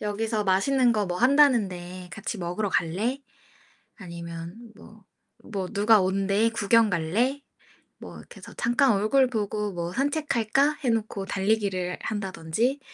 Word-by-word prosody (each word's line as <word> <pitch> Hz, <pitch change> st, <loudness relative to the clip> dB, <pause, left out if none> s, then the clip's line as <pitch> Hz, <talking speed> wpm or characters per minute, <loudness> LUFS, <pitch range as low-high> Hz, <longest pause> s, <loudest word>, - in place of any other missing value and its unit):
"여기서 210 Hz, +1 st, -2 dB
맛있는 240 Hz, +6 st, +3 dB
거 210 Hz, -3 st, 0 dB
뭐 180 Hz, 0 st, -3 dB
한다는데 200 Hz, -10 st, +2 dB
같이 215 Hz, 0 st, -5 dB
먹으러 180 Hz, +4 st, -2 dB
갈래?" 195 Hz, +10 st, -1 dB, 0.8 s
아니면 170 Hz, -2 st, -8 dB, 0.2 s
뭐 215 Hz, 0 st, -16 dB, 0.5 s
뭐 190 Hz, -3 st, -3 dB
"누가 210 Hz, +1 st, +4 dB
온대. 195 Hz, +4 st, +1 dB
구경 225 Hz, 0 st, +3 dB
갈래?" 210 Hz, -, 0 dB, 0.6 s
뭐 -, -, -11 dB
이렇게 -, -, -14 dB
해서 -, -, -12 dB
"잠깐 240 Hz, +2 st, +3 dB
얼굴 215 Hz, +6 st, +3 dB
보고 210 Hz, -2 st, -2 dB
뭐 175 Hz, -1 st, -5 dB
산책할까?" 280 Hz, 0 st, +1 dB
해 255 Hz, -, +1 dB
놓고 220 Hz, -3 st, -2 dB
달리기를 195 Hz, -3 st, -1 dB
한다든지 205 Hz, -, -2 dB
210 Hz, 280 characters per minute, -26 LUFS, 185-235 Hz, 0.8 s, 누가